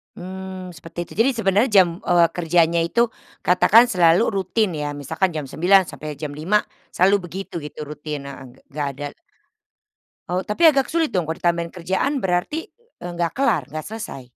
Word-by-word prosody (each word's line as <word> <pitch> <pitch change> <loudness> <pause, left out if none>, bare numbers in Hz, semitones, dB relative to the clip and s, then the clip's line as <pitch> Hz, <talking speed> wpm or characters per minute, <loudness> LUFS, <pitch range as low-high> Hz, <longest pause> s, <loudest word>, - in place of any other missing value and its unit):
Mmm, 185 0 -7
seperti 165 +3 -10
itu. - - -14
Jadi 250 +4 +5
sebenernya 205 +3 +2
jam, 175 - +2
eee, 175 -1 +4
kerjanya 170 -1 +2
itu 235 +8 +2 0.4
katakan 215 +6 +6
selalu 175 +3 +4 0.2
rutin 205 +1 0
ya. 150 -1 -3
Misalkan 145 +7 -1
jam 150 -2 -3
9.00 185 +7 +4
sampai 150 -1 -7
jam 150 -1 -5
5.00, 185 +8 +1 0.3
selalu 195 +3 +4
begitu 190 0 -6
itu 150 +1 -9
rutin, 150 -1 -6
heeh, 135 -1 -9
gek - - -24
nggak 145 0 -2
ada 145 0 -4 1.2
Oh, 180 +1 -1
tapi 265 - +3
agak 275 -4 +3
sulit 330 -1 +2
dong 180 -8 -1
kalau 160 +2 -5
ditambahin 170 -1 0
kerjaan 190 - -1
berarti, 190 - -1 0.3
eee, 175 - -6
nggak 170 -1 -1
kelar, 260 - +1
nggak 155 -1 -5
selesai. 215 - -7
175 Hz, 170 wpm, -22 LUFS, 155-195 Hz, 1.2 s, katakan